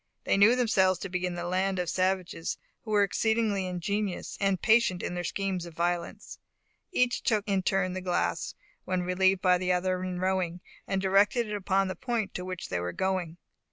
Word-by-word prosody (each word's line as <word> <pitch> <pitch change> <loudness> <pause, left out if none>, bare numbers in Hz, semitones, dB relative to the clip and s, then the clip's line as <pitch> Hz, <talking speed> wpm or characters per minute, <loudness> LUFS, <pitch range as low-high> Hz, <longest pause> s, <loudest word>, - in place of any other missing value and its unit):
They - - +2
knew 205 +5 +6
themselves 190 -7 +3
to 195 - -4
be 180 0 -1
in 175 - -4
the 175 - -4
land 185 +2 0
of 180 -1 -1
savages, 185 -2 -1 0.2
who 220 - -11
were 205 -1 +4
exceedingly 215 -2 +1
ingenious 190 +2 -3
and 195 -2 +2
patient 220 -4 +3
in - - -3
their 175 0 -3
schemes 185 -1 -2
of 165 - -12
violence. 175 0 -3 0.5
Each 250 -8 +1
took 215 -2 0
in 195 -2 +1
turn 185 0 0
the 185 - -4
glass, 180 -1 -1 0.3
when 185 -1 -1
relieved 190 +1 +2
by 180 -1 +4
the 180 0 0
other 185 0 0
in 180 -1 -3
rowing, 185 -2 -1 0.3
and 195 0 -1
directed 200 +5 +3
it 210 - -2
upon 195 -1 +1
the 185 - -4
point 235 -5 -2
to 180 - -4
which 185 -1 -6
they - - -1
were 90 0 -3
going. 185 -3 -1
185 Hz, 195 wpm, -28 LUFS, 180-200 Hz, 0.5 s, knew